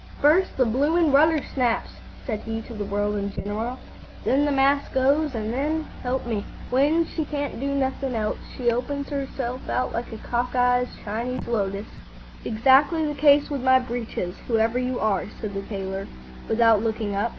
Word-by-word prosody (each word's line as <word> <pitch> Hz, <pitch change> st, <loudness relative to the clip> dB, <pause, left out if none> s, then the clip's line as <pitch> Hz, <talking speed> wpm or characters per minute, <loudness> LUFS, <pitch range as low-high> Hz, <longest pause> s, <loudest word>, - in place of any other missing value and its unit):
"First 320 Hz, +6 st, +3 dB
the 255 Hz, -, +4 dB
bloomin' 295 Hz, +7 st, +2 dB
rudder 305 Hz, +2 st, +4 dB
snaps," 245 Hz, -3 st, 0 dB, 0.3 s
said 220 Hz, -5 st, -2 dB
he 225 Hz, 0 st, -4 dB
to 235 Hz, -, -10 dB
the 210 Hz, -2 st, -4 dB
world 205 Hz, +1 st, -1 dB
in 200 Hz, 0 st, -2 dB
general; 220 Hz, +6 st, -4 dB, 0.5 s
"then 280 Hz, +3 st, +3 dB
the 290 Hz, -, +1 dB
mast 275 Hz, +1 st, +2 dB
goes; 275 Hz, +2 st, +2 dB
an' 220 Hz, -1 st, -2 dB
then, 300 Hz, +6 st, 0 dB
s' -, -, -9 dB, 0.2 s
"help 255 Hz, 0 st, -2 dB
me, 220 Hz, -4 st, -2 dB, 0.3 s
when 295 Hz, +6 st, +3 dB
she 320 Hz, -, -3 dB
can't 290 Hz, -4 st, -4 dB
do 275 Hz, -, -2 dB
nothin' 265 Hz, -1 st, -1 dB
else, 215 Hz, -1 st, -1 dB, 0.2 s
she 240 Hz, -2 st, +2 dB
opens 280 Hz, +5 st, -3 dB
'erself 265 Hz, -2 st, -4 dB
out 255 Hz, -, 0 dB
like 235 Hz, +1 st, -4 dB
a 220 Hz, -, -6 dB
cock 245 Hz, +3 st, -2 dB
eyes 245 Hz, 0 st, +3 dB, 0.2 s
Chinese 235 Hz, +5 st, -3 dB
lotus." 200 Hz, -3 st, -1 dB, 0.6 s
"Exactly 270 Hz, +8 st, +4 dB
the 295 Hz, -, -1 dB
case 290 Hz, 0 st, +4 dB
with 280 Hz, -3 st, -2 dB
my 260 Hz, 0 st, +6 dB
breeches, 235 Hz, -7 st, -3 dB
whoever 225 Hz, +1 st, +2 dB
you 255 Hz, 0 st, -1 dB
are," 210 Hz, -3 st, +1 dB
said 210 Hz, -2 st, -5 dB
the 195 Hz, -, -3 dB
tailor, 195 Hz, -1 st, -5 dB, 0.4 s
without 225 Hz, -2 st, +4 dB
looking 220 Hz, -2 st, -2 dB
up. 205 Hz, +4 st, 0 dB
250 Hz, 180 wpm, -24 LUFS, 220-280 Hz, 0.6 s, my